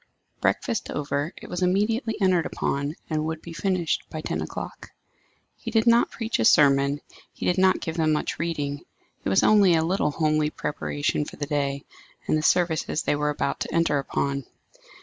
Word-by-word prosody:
Breakfast 235 -6 0
over, 145 +2 -2
it - - -10
was 180 - -4
immediately 220 +5 +1
entered 185 -4 +2
upon, 140 +2 -2
and 155 -1 -1
would 160 0 -3
be 165 +1 -10
finished 175 0 0
by 155 - -5
ten - - -3
o'clock. - - -7 0.7
He 230 - -6
did 225 -1 +2
not 235 0 +5
preach 225 - -3
a 110 - +2
sermon; 140 +1 +4 0.3
he - - -7
did 180 +1 +2
not 190 0 +4
give 160 0 -4
them 160 -1 +2
much 150 - -1
reading; 145 -4 -2 0.4
it - - -1
was 95 - +3
only 200 -5 +6
a 160 - +2
little 185 -2 +1
homely 155 0 +1
preparation 145 -1 -2
for - - -9
the 145 - -4
day 140 -1 -2 0.4
and - - +1
the 155 - +1
services 160 -2 +1
they - - +1
were 150 0 0
about 145 -1 -2
to - - -4
enter 165 -3 +2
upon. 140 0 -2
155 Hz, 185 wpm, -25 LUFS, 145-185 Hz, 0.7 s, only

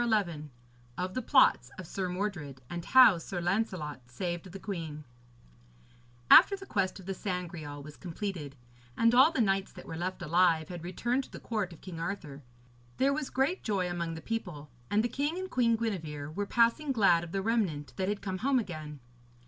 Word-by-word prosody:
XI 175 -10 0 0.5
OF 185 +1 -3
THE 255 - -2
PLOTS 230 - +4
OF 185 - -7
SIR 185 +2 -3
MORDRED; 180 -8 -4
AND 175 -1 -5
HOW 240 -9 +7
SIR 175 +2 -5
LANCELOT 175 -6 -1
SAVED 175 +7 -4
THE 195 - -7
QUEEN 165 -7 -5 1.3
After 400 - +9
the 390 0 -10
quest 195 - -1
of 190 - -12
the 195 - -3
Sangreal 170 -7 -5
was 150 0 -11
completed, 170 -5 -5 0.4
and 230 +1 +4
all 260 +5 +7
the 265 - +1
knights 195 -2 +1
that - - -11
were 160 - -6
left 180 +3 -4
alive 165 -1 +3
had 175 -2 -7
returned 240 +9 -1
to - - -19
the - - -8
court 210 -5 -2
of 170 - -13
King 175 -4 -8
Arthur, 165 -5 -5 0.6
there 275 +1 +3
was 295 -1 -3
great 275 +8 0
joy 195 -4 0
among 170 -2 -3
the 160 - -7
people, 175 - -5 0.2
and 210 +1 +2
the - - +2
king 290 +7 -2
and 375 0 -5
Queen 235 -2 +3
Gwenevere 155 -10 -4
were 205 +3 -2
passing 240 +7 +2
glad 195 -8 +4
of 170 - -8
the 195 +1 -2
remnant 185 - -1
that 190 0 0
had 205 0 -3
come 190 -2 -3
home 265 +5 +2
again. 155 - -5
185 Hz, 190 wpm, -30 LUFS, 165-225 Hz, 1.3 s, After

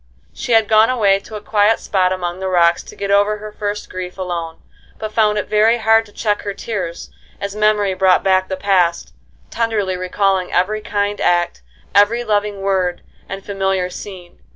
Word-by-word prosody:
She 240 - -3
had 225 -2 +4
gone 220 +2 +5
away 205 -6 +3
to 215 +2 -11
a 210 - -6
quiet 210 +1 +2
spot 185 -2 +1
among 175 -1 -3
the 190 - -3
rocks 175 -2 +3
to - - -13
get 200 0 -3
over 205 +1 +3
her 210 0 -9
first 205 0 -4
grief 185 0 -7
alone, 170 -3 -4 0.4
but 215 -1 -5
found 210 -2 +2
it 210 - -2
very 220 +2 +3
hard 225 0 +3
to - - -18
check 210 -1 -1
her 200 -1 -5
tears, 185 -7 -5 0.3
as 200 0 -5
memory 210 -2 +2
brought 185 0 +3
back 185 -1 +2
the 190 - -4
past, 180 -3 +1 0.4
tenderly 215 -5 -1
recalling 185 0 0
every 210 +4 0
kind 205 0 -2
act, 175 - +1 0.3
every 210 +4 +4
loving 205 -2 -1
word, 185 -2 -1 0.3
and 195 0 -7
familiar 190 -2 -1
scene. 180 -3 -10
200 Hz, 180 wpm, -18 LUFS, 185-210 Hz, 0.4 s, gone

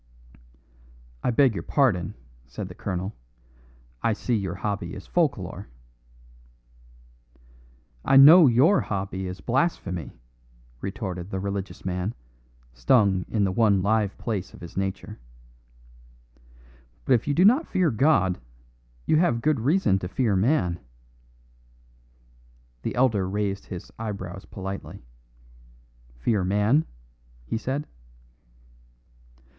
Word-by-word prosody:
"I - - +1
beg 125 0 +4
your - - -4
pardon," 110 - +1 0.3
said 65 - -6
the - - -9
colonel; 95 +1 -4 0.9
"I 115 - +2
see 120 +3 -3
your 95 -4 -2
hobby 100 -3 -4
is 95 - -9
folk 165 -5 +1
lore." 90 -9 -8 2.4
"I 135 - +4
know 155 +4 +9
your 135 - +4
hobby 95 -2 -4
is 90 +1 -7
blasphemy," 120 - -2 0.6
retorted 95 -2 -5
the 95 - -3
religious 100 0 -5
man, 90 +3 -2 0.6
stung 95 - +2
in 105 -3 0
the 95 - +1
one 100 -2 +3
live 105 -1 +1
place 105 -5 -4
of - - -16
his 85 -1 -10
nature. 95 +2 -4 1.9
"But 135 - +3
if 120 +1 +1
you 145 - +1
do 180 - +5
not 260 +10 +4
fear 185 -4 +1
God, 110 - +2 0.7
you 155 - +3
have 150 -8 +2
good 150 +1 +1
reason 125 - +2
to 90 - -5
fear 105 +2 0
man." 95 - +1 2.0
The - - -4
elder 115 -7 +2
raised 100 -1 -2
his 90 -2 -8
eyebrows 95 -4 -6
politely. 95 - -7 1.1
"Fear 95 - 0
man?" 105 - +2 0.6
he 110 - -3
said. 135 +5 -3
105 Hz, 115 wpm, -25 LUFS, 95-130 Hz, 2.4 s, know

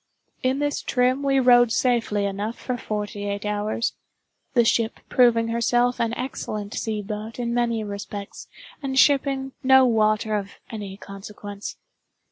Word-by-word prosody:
In 260 +1 +1
this 290 0 -1
trim 255 +2 +1
we 275 -1 +2
rode 245 -2 +6
safely 230 -5 +1
enough 205 +3 -3
for 250 - -3
forty 210 -3 -4
eight 200 +1 -3
hours—the 215 +3 -2
ship 225 0 +1
proving 230 -2 +4
herself 240 +1 +1
an 230 0 0
excellent 215 -5 -4
sea 215 -2 -2
boat 215 +2 -6
in 235 -1 -2
many 235 -2 0
respects, 200 0 -7 0.3
and 265 -2 -3
shipping 270 -1 +3
no 265 0 +6
water 215 -2 +2
of 200 -1 -3 0.2
any 200 -3 -6
consequence. 200 0 -8
230 Hz, 135 wpm, -24 LUFS, 210-250 Hz, 0.3 s, rode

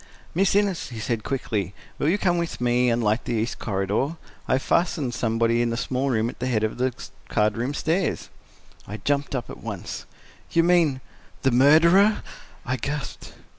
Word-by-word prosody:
"Miss 195 +3 +2
Innes," 200 -7 +1
he 115 -3 -7
said 115 -1 -2
quickly, 105 -8 -2 0.2
"will 145 - +2
you 190 - +3
come 175 -4 +1
with 170 -1 -3
me 125 0 +2
and 115 0 +1
light 110 +2 +1
the 120 - -1
east 110 +2 -2
corridor? 105 - -1 0.3
I - - +2
have 130 - +1
fastened 150 -7 +1
somebody 115 -1 +1
in 120 - +1
the 115 - -2
small 130 +2 -1
room 115 -3 +1
at 120 - -7
the 125 - -2
head 110 -4 +1
of 110 +2 -2
the 130 +1 +2 0.4
card 105 0 +2
room 125 +5 -2
stairs." 170 +6 -1 0.6
I 105 - -5
jumped! 140 +6 -1
up 125 - -3
at - - -10
once. - - -6 0.4
"You 165 - +3
mean—the 155 -5 0
murderer?" 165 - +5 0.4
I 130 +1 -1
gasped. 140 +4 -5
130 Hz, 180 wpm, -24 LUFS, 115-160 Hz, 0.6 s, murderer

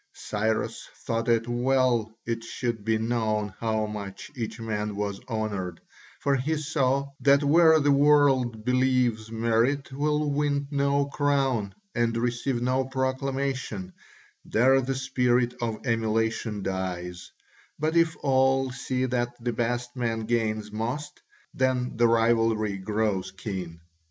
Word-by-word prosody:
Cyrus 110 +1 -2 0.2
thought 115 +1 -1
it 115 0 +2
well 120 -2 +1
it 115 0 -3
should 115 -2 -3
be 110 +1 +1
known 110 -3 -1
how 110 -1 0
much 100 -2 -7
each 115 -2 -5
man 105 -2 -3
was 100 -1 -3
honoured, 100 -6 -3 0.4
for 140 - +1
he 140 +5 0
saw 140 -2 0
that 140 +1 +4
where 160 +2 +6
the 145 -1 +3
world 140 -6 +3
believes 125 -3 +1
merit 115 +5 +1
will 150 +2 0
win 145 -1 0
no 140 0 +2
crown 135 -7 0 0.2
and 120 -1 +1
receive 120 +1 -1
no 130 +1 +1
proclamation, 130 -6 -2 0.5
there 130 +4 +3
the 135 +1 -2
spirit 125 -2 +1
of 115 0 -3
emulation 110 -2 0
dies, 90 -2 -4 0.5
but 155 +2 -1
if 165 -1 +3
all 135 -1 +3
see 130 0 -2
that 120 -1 -1
the 120 0 -2
best 120 +2 -2
man 115 -3 -1
gains 110 -2 -1
most, 120 +8 -4 0.3
then 130 -1 0
the 120 +1 +4
rivalry 115 -2 +2
grows 105 -1 -1
keen. 95 -4 -6
120 Hz, 130 wpm, -26 LUFS, 110-135 Hz, 0.5 s, where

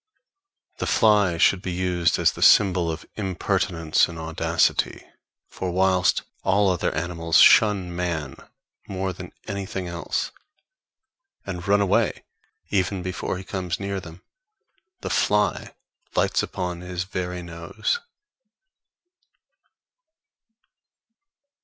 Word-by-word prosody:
The - - -2
fly 105 -6 +3
should 90 +2 +4
be 90 - -4
used 90 -1 +1
as - - +3
the - - -10
symbol 90 -4 +5
of 80 -1 -5
impertinence 95 -4 0
and 85 - -8
audacity; 80 0 0 0.4
for 95 - -5
whilst 95 0 +2 0.2
all 100 +1 +3
other 90 - 0
animals 85 0 0
shun 95 -5 +5
man 80 -6 -3 0.5
more 95 -1 -3
than 90 0 -9 0.2
anything 95 -3 -4
else, 85 0 -3 1.1
and 90 -2 -6
run 100 +1 +4
away 100 - +1 0.5
even 95 -1 0
before 90 0 -3
he 95 - -7
comes 90 -3 -4
near 100 0 -3
them, 85 -1 -12 0.8
the - - -4
fly 105 -1 +1 0.4
lights - - +2
upon 90 -1 -4
his 90 0 -4
very 90 -1 -4
nose. 85 - -3
90 Hz, 110 wpm, -24 LUFS, 85-95 Hz, 1.1 s, symbol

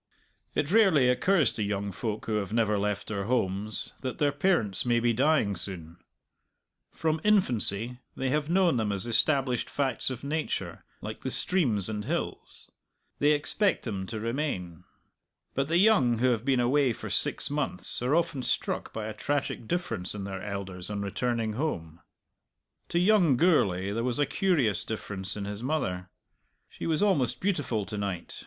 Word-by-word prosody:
It 145 +3 0
rarely 185 - +5
occurs 155 +3 +3
to - - -4
young 100 -1 -2
folk 110 +2 -4
who 110 -1 0
have 100 -1 -3
never 110 -2 +1
left 105 0 -1
their 100 -2 -3
homes 105 -3 -1
that 130 -2 -4
their 145 -1 +2
parents 145 - +3
may 120 -1 +2
be 120 0 +2
dying 130 -5 +2
soon; 85 -2 -6 0.9
from 160 -1 -1
infancy 125 - +2 0.2
they 130 -1 -1
have 150 +1 0
known 175 -6 +3
them 110 -3 0
as 100 -2 -1
established 125 +2 +2
facts 135 -3 +1
of 130 -1 -6
nature 155 +2 -3 0.2
like - - -6
the - - -3
streams 125 - 0
and 105 -1 -4
hills; 170 +6 -4 0.5
they 145 +1 +4
expect 190 +7 +2
them 95 -5 -4
to 110 -1 -5
remain. 105 - -3 0.7
But 135 +1 0
the 165 +2 +2
young 185 - +4
who 125 +2 +3
have 115 -2 -1
been 130 -1 +2
away 130 +1 +3
for - - -7
six - - +1
months 145 -11 -1
are 130 +5 +2
often 165 -5 0
struck - - -2
by 110 -1 -5
a 110 - -4
tragic 140 -4 -2
difference 115 - -2
in 100 - -5
their 95 -1 -5
elders 95 -2 -5
on 100 -1 -3
returning 115 +2 -1
home. 85 - -3 0.9
To 170 - -1
young 180 - +4
Gourlay 100 - +2
there 115 +3 -2
was 125 -1 -1
a 145 - +3
curious 140 - +1
difference 100 -3 -4
in 100 - -4
his 105 +1 -5
mother. 95 -10 -2 0.6
She - - -6
was 160 +4 +1
almost 170 - +2
beautiful 145 - -1
to 105 0 -5
night. 100 -4 -4
120 Hz, 170 wpm, -28 LUFS, 100-150 Hz, 0.9 s, rarely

